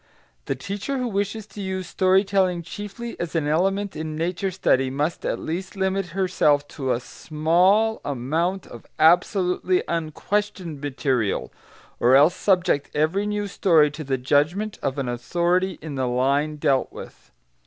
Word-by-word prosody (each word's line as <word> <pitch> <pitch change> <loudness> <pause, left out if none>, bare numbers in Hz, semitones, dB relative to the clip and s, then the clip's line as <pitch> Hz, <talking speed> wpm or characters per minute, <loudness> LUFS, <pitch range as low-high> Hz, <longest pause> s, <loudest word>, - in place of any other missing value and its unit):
The - - -1
teacher 205 +8 -4
who 250 -1 -1
wishes 205 0 -2
to 210 -1 -10
use 190 -1 -3
story 185 +2 +3
telling 185 -3 +1
chiefly 210 +6 -7
as 175 -1 -4
an 155 -3 +1
element 195 +6 0
in 155 0 -4
nature 175 +4 -1
study 135 -8 +1
must 145 +5 -2
at - - -1
least 185 +5 -5
limit 190 -1 -1
herself 150 -6 +2
to 135 -4 -3
a 120 - +1
small 180 - +1
amount 160 +8 -1
of 120 - -12
absolutely 180 +2 +3
unquestioned 170 0 -2
material, 130 -6 -1 0.5
or 125 +2 +5
else 150 +6 +6
subject 180 -7 +1
every 170 +7 +1
new 210 0 -1
story 165 -7 +3
to 155 +2 -7
the 135 -2 -1
judgment 150 +11 0
of 135 +1 -2
an 135 -2 -2
authority 175 +9 0
in 155 -2 -6
the 130 -2 -1
line 140 +5 +1
dealt 140 -3 +1
with. - - -11
170 Hz, 155 wpm, -23 LUFS, 145-195 Hz, 0.5 s, else